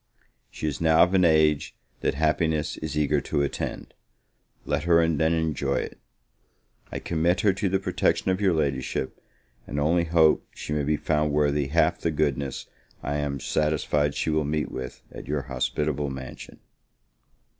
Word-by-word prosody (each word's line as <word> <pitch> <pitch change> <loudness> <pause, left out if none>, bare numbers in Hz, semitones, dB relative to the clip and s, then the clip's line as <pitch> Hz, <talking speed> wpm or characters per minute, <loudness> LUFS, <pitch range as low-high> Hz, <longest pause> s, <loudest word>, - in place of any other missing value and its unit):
She - - -6
is 75 0 -3
now 80 0 +6
of 90 +2 +1
an 95 -1 +4
age 80 -3 +3 0.2
that - - 0
happiness 80 0 +1
is 75 -1 -4
eager 75 -2 +2
to 70 - -1
attend, 70 - -4 0.7
let 75 - -1
her 85 -1 +4
then 80 0 +2
enjoy 75 -4 -1
it! - - -4 0.9
I - - -3
commit 85 +2 0
her 105 -4 +4
to 100 +1 -1
the 95 - +2
protection 95 0 0
of 95 +2 -1
your 95 -2 +4
Ladyship, 70 -3 -2 0.5
and 70 - -3
only 85 +4 +2
hope 80 -2 +3
she 75 - -5
may 75 - 0
be 75 +2 +1
found 75 -1 0
worthy 75 -1 +1
half 80 +4 +2
the 85 - +1
goodness 70 -3 -1 0.4
I 70 - -1
am 70 -1 -2
satisfied 75 0 0
she 80 - 0
will 75 0 +1
meet 75 +1 -2
with 65 -1 -7
at - - -9
your 75 -1 -1
hospitable 70 +3 -1
mansion. 65 -1 -8
75 Hz, 165 wpm, -26 LUFS, 70-80 Hz, 0.9 s, now